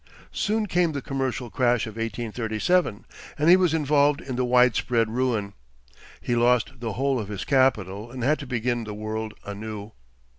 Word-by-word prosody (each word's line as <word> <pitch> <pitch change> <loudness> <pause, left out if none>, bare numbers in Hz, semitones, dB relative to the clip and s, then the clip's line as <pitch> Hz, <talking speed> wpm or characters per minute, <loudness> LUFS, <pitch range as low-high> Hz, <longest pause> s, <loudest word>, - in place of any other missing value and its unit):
Soon 215 +1 0
came 175 -4 +1
the 140 - -3
commercial 130 -3 -3
crash 120 -2 +2
of 110 - -7
1837, 115 - -1 0.3
and 150 +3 +3
he - - +10
was 185 -3 +3
involved 145 -1 +3
in 130 -2 -6
the 125 - 0
widespread 125 -2 +3
ruin. 115 -5 -1 0.7
He 120 - -1
lost 125 +1 +2
the 115 -3 -3
whole 135 +2 0
of 105 - -4
his 100 -2 -5
capital, 110 -6 +1
and 125 0 -6
had 150 +4 +2
to 140 - -7
begin 120 -1 -1
the 105 -1 -6
world 110 +1 -4
anew. 105 +1 -6
120 Hz, 170 wpm, -25 LUFS, 110-135 Hz, 0.7 s, he